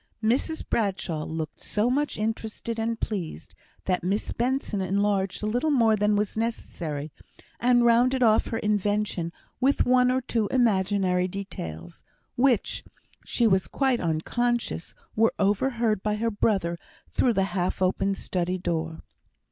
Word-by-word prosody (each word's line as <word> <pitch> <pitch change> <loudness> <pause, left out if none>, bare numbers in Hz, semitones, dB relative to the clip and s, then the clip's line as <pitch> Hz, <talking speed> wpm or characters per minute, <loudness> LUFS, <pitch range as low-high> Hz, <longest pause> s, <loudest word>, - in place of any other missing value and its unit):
Mrs 260 +8 0
Bradshaw 190 -7 -1
looked 160 -1 -5
so 210 +2 0
much 285 +4 0
interested 220 +1 -3
and 230 0 -1
pleased, 175 - -4 0.3
that 185 -2 0
Miss 195 +4 -1
Benson 245 -4 -1
enlarged 195 +1 0
a - - 0
little 245 +8 0
more 230 -6 +4
than 210 0 +2
was 205 0 0
necessary, 165 -10 -3 0.5
and 240 0 +4
rounded 245 +2 +4
off 220 -2 +4
her 225 - -2
invention 205 -4 0 0.3
with 270 +2 +3
one 250 0 +4
or 255 +1 +2
two 230 -4 -1
imaginary 195 -6 +2
details, 175 - -7 0.3
which, 250 -3 +2 0.4
she 240 - +1
was 190 -3 +3
quite 265 -3 +1
unconscious, 205 +5 -1 0.2
were 225 +1 +3
overheard 215 +1 +1
by 210 0 0
her 230 +2 -1
brother 190 -5 0 0.3
through 245 - +2
the 195 - +2
half 180 -1 -1
open 195 +1 +1
study 180 -1 -2
door. 165 -2 -3
210 Hz, 140 wpm, -26 LUFS, 185-235 Hz, 0.5 s, more